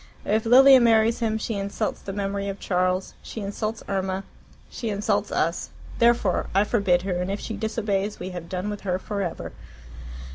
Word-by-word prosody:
If 220 +2 +1
Lilia 265 +2 +8
marries 225 -1 +4
him 220 -2 0
she 220 +1 -3
insults 200 0 -3
the 195 - -6
memory 200 0 -2
of 195 0 -5
Charles, 185 0 0
she - - -8
insults 215 +2 -4
Irma, 190 -1 -2 0.4
she 230 - -5
insults 205 0 0
us. - - -1 0.3
Therefore 235 -5 +3
I 200 - +5
forbid 200 -5 +2
her, 180 -2 -1
and 180 - -2
if 200 +1 -2
she 220 - -5
disobeys 210 -2 -2
we 185 +1 -5
have 175 -2 -7
done 185 +3 -3
with 205 - -6
her 180 -2 -1
for 200 +1 -4
ever." 175 -3 -4
200 Hz, 180 wpm, -25 LUFS, 190-220 Hz, 0.4 s, Lilia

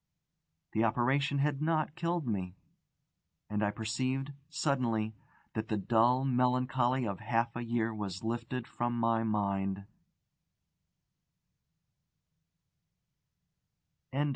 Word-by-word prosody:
The 110 - +2
operation 130 +5 +2
had 145 0 +1
not 155 -1 +1
killed 170 -2 -1
me. 95 -5 -2 1.0
And 105 0 +1
I 105 - +3
perceived, 130 +6 -1 0.2
suddenly, 120 -8 0 0.4
that 110 0 -2
the 110 - 0
dull 120 +5 +3
melancholy 125 0 +2
of 100 -4 -3
half 115 0 0
a 120 - -3
year 115 -1 0
was 100 -3 -4
lifted 120 +2 -2
from 120 -2 -2
my 115 -1 +3
mind. 100 -2 0
120 Hz, 95 wpm, -32 LUFS, 110-130 Hz, 1.0 s, I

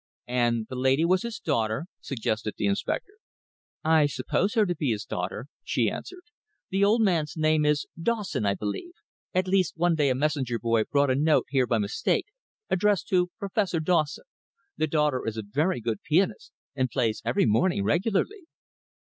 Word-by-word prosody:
"And 120 -2 +1
the 130 - -7
lady 130 +5 +2
was 185 +2 +3
his 235 -1 -4
daughter?" 110 - -1
suggested 110 -4 -3
the - - -1
inspector. 100 - -1 0.7
"I 155 -2 +4
suppose 145 +9 -1
her 220 -2 +4
to 180 - 0
be 150 -4 -1
his 105 -2 -2
daughter," 90 +6 -4 0.2
she - - +1
answered. 370 -1 -8 0.5
"The 195 +1 +2
old 220 +3 +4
man's 165 -7 +1
name 155 -1 +2
is 150 0 +2 0.2
Dawson, 210 - -1
I 100 -1 +1
believe 105 - -5 0.4
at 185 0 +2
least 185 -3 +1
one 175 +1 +3
day 150 -3 +2
a 130 - +1
messenger 135 -4 0
boy 115 -2 +1
brought 140 -1 +2
a - - +2
note 150 +3 +3
here 130 -2 +2
by 115 - +2
mistake, 105 0 0 0.4
addressed 200 +1 +1
to 180 -1 +2
Professor 195 -3 -1
Dawson. 160 - 0 0.5
The 155 - 0
daughter 150 -3 +1
is 115 0 -3
a 110 - -3
very 150 - 0
good 115 -2 -3
pianist, 175 +5 0 0.2
and 130 -2 0
plays 115 -5 0
every 120 +2 +2
morning 115 - +2
regularly." 215 - 0
150 Hz, 170 wpm, -27 LUFS, 120-185 Hz, 0.7 s, I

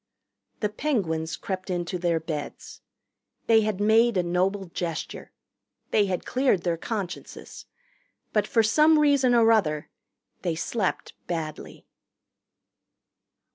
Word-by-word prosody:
The 210 - +1
Penguins 180 - -2
crept 190 0 -5
into 175 0 -2
their 170 -2 +1
beds. 155 -2 -7 0.6
They 225 -1 +5
had 215 -2 -1
made 220 +1 +4
a 180 - +2
noble 185 +3 0
gesture. 170 -1 -5 0.6
They 205 -2 +3
had 180 -2 -3
cleared 255 -9 +1
their 175 -2 0
consciences. 195 0 -6 0.7
But 210 -1 +2
for 225 - +3
some 305 +8 +5
reason 280 -4 +4
or 230 -1 +5
other 155 -9 +1 0.5
they 170 -3 -1
slept 190 +4 -2
badly. 160 -3 -5
195 Hz, 115 wpm, -26 LUFS, 170-225 Hz, 0.7 s, They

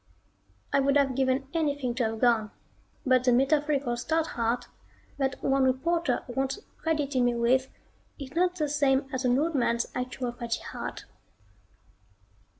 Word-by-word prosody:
I - - +5
would 275 +1 +3
have 275 -2 +2
given 265 +1 0
anything 285 -6 0
to 245 0 -1
have 220 0 -3
gone, 230 -3 +3 0.6
but 255 -1 +4
the 250 - +4
metaphorical 275 0 +2
stout 315 +7 0
heart 235 +1 -1 0.5
that 270 -1 0
one 270 0 +2
reporter 330 +7 +1
once 270 +5 -2 0.2
credited 290 -5 0
me 245 -1 +2
with 250 +3 +2 0.5
is 275 -2 -8
not 360 +1 +2
the 305 -4 -1
same 280 -2 +2
as 260 0 -2
an 250 0 +3
old 325 +4 +1
man's 235 -3 +1
actual 250 0 -3
fatty 235 -1 -4
heart. - - -6
265 Hz, 150 wpm, -28 LUFS, 245-285 Hz, 0.6 s, I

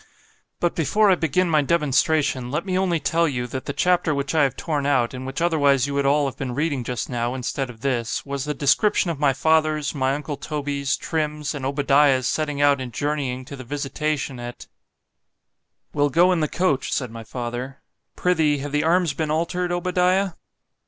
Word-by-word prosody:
But 175 - +1
before 200 +6 +3
I - - +5
begin 175 +2 +1
my 155 -3 +3
demonstration, 145 -3 +1
let 150 +7 -2
me 185 -2 -2
only 185 -3 +1
tell 165 +3 +1
you, 125 -4 -2
that 130 +2 -6
the - - -2
chapter 175 0 +1
which 140 +1 -2
I 160 - +3
have 140 -3 +2
torn 145 -4 -2
out, 130 -4 +2
and 130 0 -6
which 135 +5 -3
otherwise 145 -6 +3
you 140 - -4
would 140 0 +1
all 145 +1 +3
have 135 -1 -3
been 130 -3 -4
reading 145 -3 -1
just 125 0 -3
now, 120 0 -2
instead 130 +1 -3
of 115 -2 -12
this——was 135 +2 -2
the 150 0 -3
description 170 +7 +2
of 155 - -6
my 145 -2 +4
father's, 155 +1 +1
my 135 -2 0
uncle 145 0 -5
Toby's, 140 -2 -2
Trim's, 150 -2 -2
and 135 -3 -3
Obadiah's 140 -2 +3
setting 150 -2 -1
out 145 -1 +4
and 125 -2 -5
journeying 135 -2 -2
to 140 - -8
the 130 - -9
visitation 145 0 -3
at 120 0 -8 1.3
We'll 145 0 +2
go 175 +6 +4
in 180 - +1
the 155 - +1
coach, 155 -4 0
said 125 -4 -2
my 115 0 -8
father—Prithee, 135 +7 -2
have 145 +1 -5
the 150 +1 +1
arms 170 -1 +2
been 155 0 -2
altered, 175 +3 -1
Obadiah? 180 +2 +1
145 Hz, 190 wpm, -23 LUFS, 135-160 Hz, 1.3 s, I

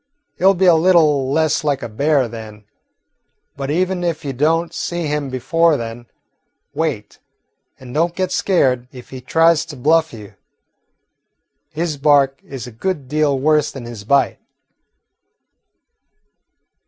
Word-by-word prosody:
He - - -9
'll 195 +1 +6
be 190 +2 +1
a 175 - +7
little 160 -6 +3
less 155 +1 +1
like 145 -4 -1
a - - -3
bear 140 +4 +1
then. 110 -2 -10 0.9
But 140 0 -5
even 180 +3 0
if 165 -3 -2
you 135 - -3
don't 165 +5 0
see 175 -1 -3
him 150 -2 -2
before 160 +5 +1
then, 115 +1 -7 0.7
wait, - - -3 0.6
and 125 -1 -11
don't 170 +3 0
get 185 -1 -2
scared 130 -11 +1
if 125 -2 -13
he 130 -1 -8
tries 165 +4 +3
to 155 - -9
bluff 160 +5 +2
you. 105 -3 -11 1.4
His 160 -1 -3
bark 140 -1 +3
is 135 -4 -8
a 125 - -9
good 145 +4 -4
deal 150 0 +1
worse 150 +2 +2
than 130 -3 -9
his 115 -3 -9
bite." 140 +5 +1
145 Hz, 140 wpm, -18 LUFS, 130-165 Hz, 1.4 s, a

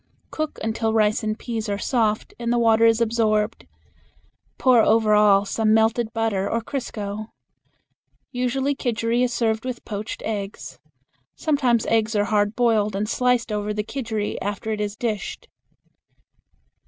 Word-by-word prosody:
Cook 310 -1 -3
until 220 0 -1
rice 215 -1 +2
and 215 0 -2
peas 225 -3 -4
are 200 - -1
soft 215 -1 0
and 235 0 -1
the 240 - +2
water 230 -1 +4
is 225 0 +3
absorbed. 220 -1 0 0.9
Pour 255 -3 +5
over 220 -1 +3
all 205 -1 +5
some 220 +1 +2
melted 225 +1 +2
butter 220 -4 -1
or 230 - 0
crisco. 215 -4 -5 1.0
Usually 265 +2 0
kidgeri 235 -2 -1
is 250 -1 +1
served 225 -2 0
with 255 -2 -5
poached 210 0 -5
eggs. 200 - -5 0.6
Sometimes 260 -7 +1
eggs 220 -1 +1
are 205 0 +2
hard 205 0 +1
boiled 220 -4 +2
and 205 +2 -1
sliced 250 0 +1
over 210 0 -2
the 210 - -1
kidgeri 220 -3 -3
after 205 +2 -3
it 210 -1 -2
is 205 0 -3
dished. 220 -3 -4
220 Hz, 145 wpm, -23 LUFS, 210-235 Hz, 1.0 s, Pour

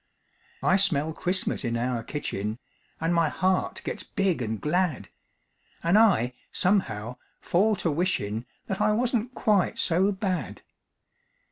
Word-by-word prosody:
I 185 - +4
smell 160 -5 +1
Christmas 185 0 -1
in 120 -1 -1
our 120 0 -1
kitchen, 110 -5 -4 0.4
An' 165 +2 0
my 165 -2 +3
heart 185 +2 0
gets - - -3
big 195 - -1
an' 110 -1 -2
glad, 165 - 0 0.7
An' 170 +3 +3
I, 190 - +4 0.2
somehow, 125 - 0 0.2
fall 210 +5 +2
to 170 -4 -1
wishin', 125 - -1 0.2
That 195 +1 -3
I 210 0 +3
wasn't 240 +1 0
quite 205 -4 +2
so 185 +4 +3
bad. 190 -2 -3
175 Hz, 130 wpm, -27 LUFS, 125-195 Hz, 0.7 s, I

